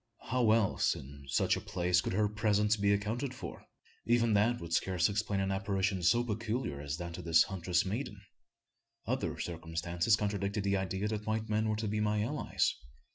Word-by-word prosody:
How 125 Hz, -3 st, +3 dB
else 110 Hz, -3 st, +3 dB
in 70 Hz, +1 st, -10 dB
such 70 Hz, -, +2 dB
a -, -, -4 dB
place 90 Hz, 0 st, +1 dB
could -, -, -3 dB
her 105 Hz, +2 st, +2 dB
presence 105 Hz, 0 st, +2 dB
be 100 Hz, -1 st, +2 dB
accounted 115 Hz, +6 st, -1 dB
for? 85 Hz, -, -8 dB, 0.4 s
Even 115 Hz, -1 st, +3 dB
that 115 Hz, +4 st, +3 dB
would 85 Hz, -1 st, -6 dB
scarce 90 Hz, -1 st, +2 dB
explain 105 Hz, -1 st, -1 dB
an 95 Hz, 0 st, 0 dB
apparition 95 Hz, -1 st, 0 dB
so 85 Hz, +8 st, +4 dB
peculiar 110 Hz, -, -3 dB
as 70 Hz, 0 st, -4 dB
that 85 Hz, -1 st, -6 dB
of -, -, -7 dB
this 80 Hz, 0 st, +6 dB
huntress 90 Hz, -2 st, 0 dB
maiden! 105 Hz, +1 st, -4 dB, 0.9 s
Other -, -, -2 dB
circumstances 85 Hz, +4 st, 0 dB
contradicted 100 Hz, -1 st, -2 dB
the 100 Hz, 0 st, +1 dB
idea 95 Hz, +2 st, -2 dB
that 105 Hz, 0 st, -4 dB
white 110 Hz, 0 st, -1 dB
men 110 Hz, +1 st, +1 dB
were 110 Hz, -, +1 dB
to 110 Hz, 0 st, -2 dB
be 105 Hz, +1 st, -1 dB
my 105 Hz, 0 st, +1 dB
allies. -, -, 0 dB
100 Hz, 185 wpm, -32 LUFS, 90-110 Hz, 0.9 s, this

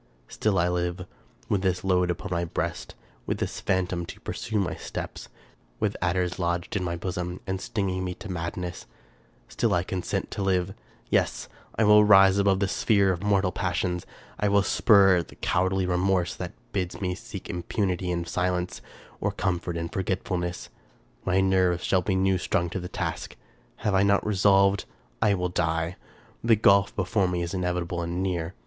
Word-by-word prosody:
Still 105 Hz, -3 st, 0 dB
I 85 Hz, 0 st, +3 dB
live; 90 Hz, 0 st, -2 dB, 0.4 s
with 100 Hz, -, +1 dB
this 90 Hz, -2 st, 0 dB
load 90 Hz, -2 st, +2 dB
upon 100 Hz, +3 st, -3 dB
my 85 Hz, -1 st, 0 dB
breast; 85 Hz, -, -4 dB, 0.3 s
with -, -, -1 dB
this -, -, -3 dB
phantom 90 Hz, -2 st, 0 dB
to -, -, -9 dB
pursue 110 Hz, -, -3 dB
my 95 Hz, -, 0 dB
steps; -, -, -7 dB, 0.5 s
with -, -, 0 dB
adders 90 Hz, +1 st, 0 dB
lodged 85 Hz, +1 st, -1 dB
in 100 Hz, -, 0 dB
my 85 Hz, -1 st, -2 dB
bosom, 90 Hz, 0 st, -4 dB
and 95 Hz, 0 st, -3 dB
stinging 95 Hz, -3 st, -2 dB
me 90 Hz, -1 st, -3 dB
to -, -, -9 dB
madness; 90 Hz, -2 st, -5 dB, 0.6 s
still -, -, 0 dB
I 85 Hz, -, +1 dB
consent 90 Hz, -1 st, -3 dB
to -, -, -4 dB
live! 95 Hz, -1 st, +1 dB, 0.4 s
Yes! -, -, +1 dB, 0.3 s
I 110 Hz, -, +2 dB
will 105 Hz, 0 st, +7 dB
rise 95 Hz, -1 st, +7 dB
above 100 Hz, -1 st, +3 dB
the 100 Hz, -, +2 dB
sphere 100 Hz, -1 st, +3 dB
of 85 Hz, -, -6 dB
mortal 100 Hz, -2 st, +2 dB
passions; 90 Hz, -1 st, -2 dB, 0.3 s
I 105 Hz, -, +2 dB
will 100 Hz, 0 st, +4 dB
spurn 100 Hz, -5 st, +5 dB
at 85 Hz, -, -4 dB
the -, -, -14 dB
cowardly 95 Hz, +1 st, +1 dB
remorse 90 Hz, 0 st, +1 dB
that -, -, -6 dB, 0.2 s
bids 90 Hz, -2 st, -2 dB
me 90 Hz, -2 st, -1 dB
seek -, -, -8 dB
im 90 Hz, -, -4 dB
punity 90 Hz, -1 st, -1 dB
in 85 Hz, -1 st, -1 dB
silence, 90 Hz, 0 st, -1 dB, 0.4 s
or -, -, 0 dB
comfort 90 Hz, -2 st, -2 dB
in 85 Hz, 0 st, -2 dB
forgetfulness. 90 Hz, -1 st, -3 dB, 0.6 s
My 95 Hz, +1 st, +3 dB
nerves 95 Hz, -2 st, +2 dB
shall 95 Hz, -, +2 dB
be 95 Hz, +1 st, 0 dB
new 95 Hz, 0 st, +2 dB
strung 85 Hz, -1 st, 0 dB
to 95 Hz, -, -2 dB
the 90 Hz, 0 st, -6 dB
task. -, -, -4 dB, 0.4 s
Have 105 Hz, -, -1 dB
I 95 Hz, -, +4 dB
not 100 Hz, 0 st, +3 dB
resolved? 100 Hz, -1 st, +3 dB, 0.4 s
I 100 Hz, -, +4 dB
will 90 Hz, -1 st, -1 dB
die. 85 Hz, 0 st, -1 dB, 0.5 s
The 115 Hz, -1 st, +5 dB
gulf 100 Hz, -1 st, +4 dB
before 95 Hz, +1 st, +1 dB
me 90 Hz, -1 st, -1 dB
is 85 Hz, -, -4 dB
inevitable 90 Hz, -1 st, -1 dB
and 85 Hz, +2 st, -2 dB
near. 90 Hz, -1 st, -2 dB
90 Hz, 180 wpm, -26 LUFS, 90-95 Hz, 0.6 s, will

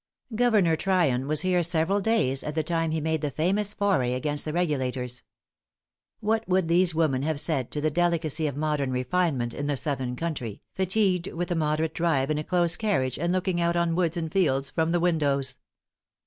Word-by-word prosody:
Governor 215 Hz, -8 st, +3 dB
Tryon 160 Hz, -9 st, +1 dB
was 155 Hz, 0 st, +4 dB
here 185 Hz, -1 st, +2 dB
several 170 Hz, +4 st, +2 dB
days, 185 Hz, -, +1 dB
at 150 Hz, -, -5 dB
the 160 Hz, -, 0 dB
time 165 Hz, 0 st, -1 dB
he 160 Hz, 0 st, -1 dB
made 160 Hz, 0 st, -1 dB
the 150 Hz, -, -1 dB
famous 190 Hz, +9 st, 0 dB
foray 180 Hz, -12 st, +1 dB
against 145 Hz, +2 st, -1 dB
the 155 Hz, -, -3 dB
Regulators. 130 Hz, -7 st, -2 dB, 1.0 s
What 220 Hz, +1 st, 0 dB
would 185 Hz, -2 st, +2 dB
these 170 Hz, 0 st, +2 dB
women 155 Hz, -5 st, +1 dB
have 155 Hz, 0 st, -1 dB
said 140 Hz, -6 st, +1 dB
to 150 Hz, -, -4 dB
the 155 Hz, +1 st, +1 dB
delicacy 160 Hz, -2 st, 0 dB
of 140 Hz, -1 st, -5 dB
modern 150 Hz, -3 st, -1 dB
refinement 130 Hz, -1 st, -1 dB
in 145 Hz, -, -4 dB
the 145 Hz, -1 st, 0 dB
southern 130 Hz, -3 st, -2 dB
country, 125 Hz, -10 st, -5 dB
fatigued 190 Hz, -1 st, +1 dB
with 175 Hz, +1 st, -4 dB
a -, -, +1 dB
moderate 155 Hz, 0 st, 0 dB
drive 155 Hz, -5 st, 0 dB
in 150 Hz, -, 0 dB
a -, -, -3 dB
close 175 Hz, 0 st, +2 dB
carriage, 135 Hz, -, -1 dB
and 170 Hz, +2 st, 0 dB
looking 185 Hz, -1 st, 0 dB
out 170 Hz, 0 st, +1 dB
on 170 Hz, -1 st, +1 dB
woods 175 Hz, 0 st, 0 dB
and 160 Hz, -2 st, -3 dB
fields 135 Hz, -8 st, +1 dB
from 160 Hz, 0 st, 0 dB
the 175 Hz, +1 st, +1 dB
windows! 140 Hz, -6 st, 0 dB
160 Hz, 190 wpm, -26 LUFS, 140-175 Hz, 1.0 s, was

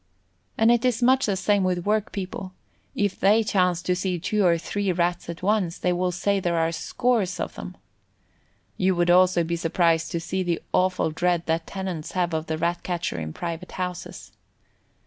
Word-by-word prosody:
And 225 Hz, +1 st, +5 dB
it 240 Hz, 0 st, +3 dB
is 250 Hz, -1 st, +1 dB
much 260 Hz, +1 st, +4 dB
the 200 Hz, -, +1 dB
same 205 Hz, +1 st, +2 dB
with 180 Hz, -1 st, -1 dB
workpeople; 195 Hz, -3 st, -2 dB, 0.4 s
if 205 Hz, -2 st, -1 dB
they 210 Hz, +4 st, +4 dB
chance 180 Hz, -5 st, +1 dB
to 180 Hz, -, +1 dB
see 185 Hz, 0 st, -1 dB
two 205 Hz, +5 st, 0 dB
or 170 Hz, -2 st, +4 dB
three 200 Hz, +3 st, -2 dB
Rats 175 Hz, 0 st, -1 dB
at 170 Hz, +1 st, -7 dB
once, 195 Hz, -4 st, +1 dB
they 180 Hz, -, 0 dB
will 180 Hz, +1 st, 0 dB
say 200 Hz, +3 st, 0 dB
there 175 Hz, -2 st, 0 dB
are 165 Hz, 0 st, +1 dB
"scores" 205 Hz, -1 st, 0 dB
of -, -, -3 dB
them. 180 Hz, -, -8 dB, 1.0 s
You 185 Hz, 0 st, +2 dB
would 175 Hz, 0 st, +3 dB
also 180 Hz, -1 st, +5 dB
be 170 Hz, +1 st, -2 dB
surprised 165 Hz, 0 st, +1 dB
to 170 Hz, -, 0 dB
see 190 Hz, +3 st, -3 dB
the 175 Hz, -2 st, -1 dB
awful 185 Hz, -3 st, +2 dB
dread 175 Hz, +1 st, 0 dB
that 165 Hz, 0 st, -1 dB
tenants 185 Hz, -5 st, -5 dB
have 180 Hz, -2 st, 0 dB
of 160 Hz, 0 st, -2 dB
the 160 Hz, -, -2 dB
Rat 170 Hz, +2 st, -1 dB
catcher 175 Hz, -, -3 dB
in 80 Hz, -1 st, -5 dB
private 170 Hz, -, -6 dB
houses. 180 Hz, -1 st, -5 dB
180 Hz, 185 wpm, -25 LUFS, 170-195 Hz, 1.0 s, And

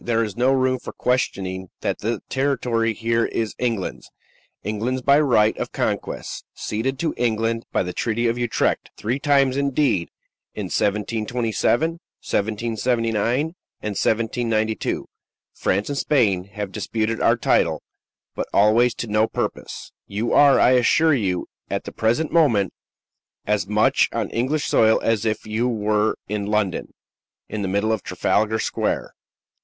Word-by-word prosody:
There 115 Hz, -1 st, +1 dB
is 105 Hz, -3 st, -4 dB
no 125 Hz, +3 st, +3 dB
room 130 Hz, -1 st, +2 dB
for -, -, -8 dB
questioning 95 Hz, -7 st, -1 dB
that -, -, -1 dB
the 115 Hz, +3 st, -2 dB
territory 125 Hz, -4 st, 0 dB
here 115 Hz, 0 st, +1 dB
is 110 Hz, -2 st, -2 dB
England's 115 Hz, -6 st, -2 dB, 0.5 s
England's 115 Hz, +5 st, -2 dB
by 140 Hz, +2 st, +5 dB
right 110 Hz, -7 st, +3 dB
of -, -, -3 dB
conquest; -, -, -3 dB
ceded 130 Hz, +5 st, -2 dB
to 160 Hz, +3 st, -1 dB
England 115 Hz, -1 st, 0 dB
by -, -, +1 dB
the 90 Hz, 0 st, -5 dB
Treaty 120 Hz, +3 st, -1 dB
of 115 Hz, -, +1 dB
Utrecht. 120 Hz, -1 st, 0 dB
Three 120 Hz, +6 st, -2 dB
times, 140 Hz, -2 st, +3 dB
indeed 140 Hz, -, +1 dB, 0.5 s
in -, -, -3 dB
1727, 115 Hz, +7 st, 0 dB
1779, 115 Hz, -, -1 dB
and 160 Hz, +2 st, -1 dB, 0.4 s
1792 110 Hz, 0 st, 0 dB, 0.5 s
France 100 Hz, +2 st, 0 dB
and 145 Hz, -, -3 dB
Spain 100 Hz, -11 st, +2 dB
have 100 Hz, 0 st, -6 dB
disputed 110 Hz, +2 st, -2 dB
our -, -, +4 dB
title, -, -, +1 dB, 0.5 s
but -, -, -3 dB
always 115 Hz, +4 st, +4 dB
to -, -, -4 dB
no 110 Hz, 0 st, +2 dB
purpose. -, -, -4 dB, 0.2 s
You 105 Hz, +4 st, -2 dB
are, 145 Hz, -1 st, +6 dB
I 125 Hz, -, +5 dB
assure 145 Hz, +6 st, +4 dB
you, 95 Hz, -9 st, 0 dB, 0.2 s
at -, -, -2 dB
the -, -, -7 dB
present 120 Hz, +8 st, 0 dB
moment, 120 Hz, -, +3 dB, 0.7 s
as 105 Hz, -3 st, 0 dB
much 105 Hz, +1 st, +3 dB
on -, -, -2 dB
English 140 Hz, +5 st, 0 dB
soil 110 Hz, 0 st, +4 dB
as 115 Hz, -1 st, +1 dB
if 110 Hz, -1 st, -1 dB
you 110 Hz, +3 st, 0 dB
were 105 Hz, -2 st, +1 dB
in 100 Hz, 0 st, -3 dB
London, 105 Hz, -4 st, -1 dB, 0.6 s
in 110 Hz, 0 st, -4 dB
the 100 Hz, -, -1 dB
middle 100 Hz, +3 st, +1 dB
of 110 Hz, -3 st, 0 dB
Trafalgar 110 Hz, +1 st, 0 dB
Square." -, -, -2 dB
115 Hz, 145 wpm, -22 LUFS, 105-125 Hz, 0.7 s, are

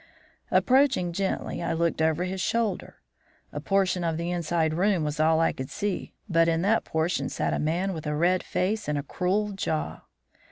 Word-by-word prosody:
"Approaching 255 Hz, -10 st, +3 dB
gently, 190 Hz, 0 st, -2 dB
I 170 Hz, -, -1 dB
looked 165 Hz, -1 st, 0 dB
over 160 Hz, +2 st, +2 dB
his 185 Hz, +1 st, -3 dB
shoulder. 225 Hz, -4 st, -1 dB, 0.6 s
A -, -, -3 dB
portion 190 Hz, -3 st, +1 dB
of 165 Hz, -2 st, -1 dB
the 170 Hz, +1 st, -2 dB
inside 170 Hz, -2 st, 0 dB
room 185 Hz, 0 st, +2 dB
was 150 Hz, 0 st, -3 dB
all 160 Hz, +1 st, +4 dB
I 165 Hz, -, +3 dB
could 130 Hz, 0 st, -6 dB
see, 205 Hz, -2 st, -3 dB
but 165 Hz, -3 st, +3 dB
in 165 Hz, 0 st, +1 dB
that 215 Hz, +3 st, +2 dB
portion 160 Hz, +2 st, -1 dB
sat -, -, -1 dB
a -, -, -1 dB
man 175 Hz, +5 st, 0 dB
with 160 Hz, -2 st, -6 dB
a 150 Hz, -, -1 dB
red 180 Hz, +4 st, +2 dB
face 210 Hz, +4 st, -1 dB
and 150 Hz, -1 st, 0 dB
a 145 Hz, -, -2 dB
cruel 195 Hz, +7 st, -1 dB
jaw. 160 Hz, -5 st, -3 dB
175 Hz, 190 wpm, -26 LUFS, 160-195 Hz, 0.6 s, all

